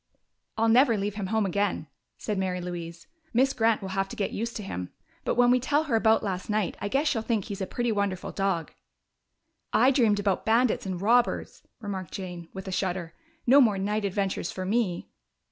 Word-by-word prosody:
"I'll 225 +1 +2
never 235 0 +5
leave 200 +1 -2
him 200 -2 -4
home 220 +1 +1
again," 195 -3 -1 0.3
said 210 -2 -3
Mary 185 -1 -1
Louise. 170 -1 -6 0.3
"Miss 265 +3 +4
Grant 225 -3 +2
will 190 - -4
have 195 0 -1
to - - -7
get 200 - -2
used 230 +2 -3
to 210 - -4
him. 90 - -5 0.3
But - - 0
when 245 0 +5
we 255 - +4
tell 290 +5 +1
her 285 -7 -1
about 220 0 +3
last 185 -1 -3
night 210 -3 0
I 205 - -1
guess 275 +8 +1
she'll 225 - 0
think 220 -3 -1
he's 200 -1 -6
a 190 - -2
pretty 240 +2 -1
wonderful 200 -3 -1
dog." 195 -5 -1 1.0
"I 260 - +5
dreamed 230 -6 +3
about 200 -2 0
bandits 230 -2 +2
and 185 -2 -3
robbers," 235 +5 +1 0.2
remarked 195 -6 -5
Jane, 175 -3 -7
with 190 0 -8
a - - -3
shudder. 180 -2 -2 0.3
"No 270 +4 +7
more 215 -6 +3
night 210 +2 -1
adventures 195 -3 -1
for 185 - -5
me!" 195 -4 0
205 Hz, 200 wpm, -27 LUFS, 190-230 Hz, 1.0 s, No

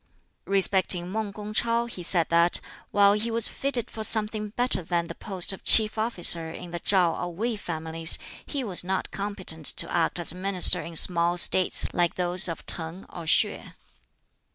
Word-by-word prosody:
Respecting 190 -2 +4
Mang 215 0 -5
Kung 210 +1 -10
ch'oh, 235 +1 -1
he 210 -6 -10
said 170 -1 -1
that, 170 +1 +3 0.3
while 200 0 +3
he 215 +3 -3
was 230 -1 0
fitted 255 -4 -3
for 220 - -7
something 215 -1 +2
better 245 -1 -3
than 170 0 -3
the - - -9
post 190 -2 0
of 195 - -12
chief 215 -1 +5
officer 175 -7 0
in 175 +1 -11
the 175 - -6
ChŠu 180 -3 0
or 175 -1 -7
Wei 230 +5 -3
families, 160 -3 -1 0.3
he 280 -3 -6
was 190 -7 -2
not 190 +1 -4
competent 195 -6 -4
to - - 0
act 170 0 -2
as 170 -2 +4
minister 185 0 +3
in 165 - -11
small 170 +1 +2
States 185 +1 +3
like 175 -1 -1
those 180 +1 -1
of 165 - -8
T'ang 165 +3 -6
or 170 -2 -9
Sieh. - - +1
185 Hz, 175 wpm, -24 LUFS, 170-215 Hz, 0.3 s, chief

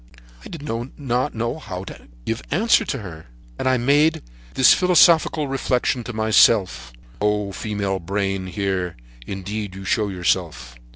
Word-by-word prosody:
"I - - -10
did 165 -4 -8
not 125 +1 -3
know 115 +7 -3
what 90 0 -7 0.5
answer 210 +10 +3
to - - -2
give - - -8
her, 80 -5 -10 0.3
and 130 - +1
I 130 - +3
made 145 - +2 0.3
this 130 - +7
philosophical 170 -4 +4
reflection 130 -2 -1
to 120 - -5
myself: 110 - +3 0.3
'Oh! 105 -1 0
female 100 -1 -3
brain, 95 +1 -2
here; 95 -4 -2 0.3
indeed, 100 +1 -5
you 95 0 -9
show 105 +1 +1
yourself!' 85 -9 -2
105 Hz, 135 wpm, -22 LUFS, 95-130 Hz, 0.5 s, this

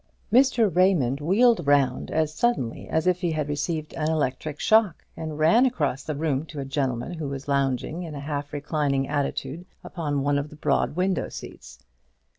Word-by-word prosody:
Mr. 240 - +4
Raymond 160 -8 +3
wheeled 210 +3 +3
round 140 -3 +2
as 155 -1 0
suddenly 155 - -1
as 160 0 0
if 180 0 +2
he 175 -3 0
had 155 -2 -2
received 155 +2 -3
an 155 0 -1
electric 150 -1 -2
shock, 215 -6 +3
and 155 -2 -5
ran 165 +11 +5
across 150 - 0
the 155 - -4
room 145 -2 -1
to 150 - -8
a 135 - -3
gentleman 135 +1 -2
who 160 -4 -4
was 140 +1 -6
lounging 140 +3 0
in 160 -4 -6
a - - -5
half 145 0 -4
reclining 145 -2 -1
attitude 145 +2 -3 0.2
upon 145 -5 -3
one 145 0 +2
of 140 +1 -5
the 155 - -12
broad 150 - 0
window 185 0 0
seats. - - -10
150 Hz, 180 wpm, -25 LUFS, 140-170 Hz, 0.2 s, ran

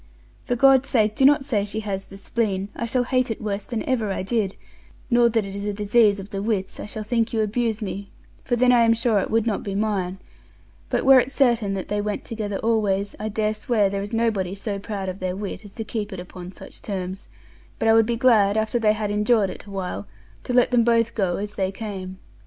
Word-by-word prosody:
For 245 - 0
God's 270 +1 +5
sake 215 -4 +2
do 265 - +3
not 285 0 +5
say 220 -8 +1
she 210 +2 -3
has 195 -2 -4
the 195 - -11
spleen, 200 -1 -2
I 235 - -3
shall 245 +2 +1
hate 255 0 +1
it 225 - -3
worse 205 -1 -3
than 230 -3 -3
ever 230 -6 0
I 190 - -2
did, 200 -1 -1 0.6
nor 240 0 +5
that 225 -2 0
it 195 0 -7
is 200 +1 -4
a 205 - -2
disease 210 0 +3
of 195 +1 -9
the 195 -2 -3
wits, 200 -3 -2
I - - -6
shall 215 +1 -5
think 230 +1 0
you 225 - +1
abuse 220 +1 -1
me, 200 0 -5 0.3
for 245 - 0
then 250 +1 +4
I 245 -1 +5
am 230 0 +5
sure 230 -2 +2
it - - -2
would 225 0 +1
not 220 -4 -1
be 200 -1 -4
mine; 195 -3 -1 0.7
but - - 0
were 265 -1 +8
it 250 - 0
certain 235 -7 +2
that 190 - -5
they 205 0 0
went 210 0 -3
together 210 -3 -3
always, 205 -3 0
I 215 +1 -3
dare 215 0 0
swear 215 -2 +1
there 200 0 -2
is 205 - -6
nobody 215 -5 0
so 200 0 -3
proud 200 -2 -5
of 185 +1 -5
their 185 0 -2
wit 200 0 -5
as 205 - -13
to 225 - -4
keep 215 -1 -4
it 190 - -6
upon 180 0 -9
such - - -12
terms, 190 -1 -5 0.5
but 225 0 +3
would 225 -1 +5
be 235 - 0
glad 220 -4 +4
after 220 +2 +1
they 215 -2 +3
had 210 -1 -2
endured 210 -1 +2
it - - -10
a - - -13
while 180 - -4 0.4
to - - -3
let 245 0 +4
them 240 -2 +4
both 230 0 +2
go 185 -5 0
as 205 +1 -4
they 190 -2 -1
came. 195 -3 -6
210 Hz, 240 wpm, -23 LUFS, 195-230 Hz, 0.7 s, were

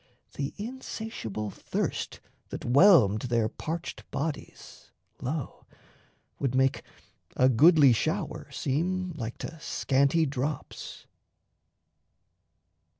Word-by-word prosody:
The 140 0 -4
insatiable 215 - -5
thirst - - -3 0.3
That - - -6
whelmed 125 - +6
their 115 -2 +2
parched 160 +8 -6
bodies, 145 +2 -6 0.3
lo, 140 0 -4 0.7
would 130 -2 0
make 130 0 +2 0.5
A 130 - +5
goodly 140 +1 +6
shower 110 - -2
seem 180 +6 -1
like 120 -5 -5
to 160 - -7
scanty 140 +1 +2
drops. 140 +1 -4
140 Hz, 90 wpm, -28 LUFS, 125-165 Hz, 0.7 s, whelmed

